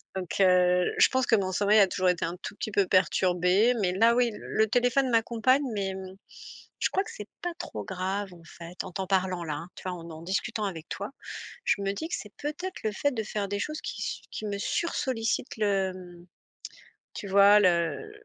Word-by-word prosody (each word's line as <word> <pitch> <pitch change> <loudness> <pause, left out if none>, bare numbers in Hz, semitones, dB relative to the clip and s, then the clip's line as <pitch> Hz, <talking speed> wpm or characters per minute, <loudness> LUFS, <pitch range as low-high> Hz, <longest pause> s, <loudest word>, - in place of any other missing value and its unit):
Donc, 185 -3 -4
heu, 180 -1 +4
je - - +7
pense 260 -1 +1
que 225 - +4
mon 190 -2 -1
sommeil 205 +3 +4
a 195 - +7
toujours 185 0 0
été 180 -1 +1
un 170 +2 -3
tout - - -6
petit 215 - -4
peu 195 -2 +2
perturbé, 185 +4 +3
mais 180 -2 +1
là 230 +5 +4
oui, 245 -1 +3
le 220 - 0
téléphone 245 +3 +2
m'accompagne, 235 +4 +3
mais 195 -1 -2
mmh, 190 0 -8 0.6
je - - +1
crois 385 +2 +1
que 450 - -9
c'est - - -9
pas 350 -1 -2
trop - - -6
grave, 190 +1 -3
en 170 - -16
fait. 170 +1 -8
En 185 - -7
t'en 190 0 -3
parlant 185 -2 0
là, 155 -2 -3
hein, 170 +4 -7
tu - - -10
vois, - - -2
en 165 0 -10
en 160 0 -9
discutant 205 +4 -2
avec 165 -5 -5
toi, 200 - -5 0.5
je 200 - +1
me 195 0 0
dis 320 +11 -5
que - - -3
c'est 210 - -9
peut-être 310 +6 -5
le 215 - 0
fait 285 +7 0
de 225 - -2
faire 205 -1 -3
des 205 +1 -2
choses 305 +8 -3
qui - - -5 0.3
sur 215 - -5
me 200 - -2
sursollicitent 250 -3 -1
le, 195 -3 +1
hem, 175 -1 -12 0.9
tu 205 - -6
vois, 200 +2 +7
le, 200 - +5
heu, 170 - 0
200 Hz, 215 wpm, -28 LUFS, 185-230 Hz, 0.9 s, je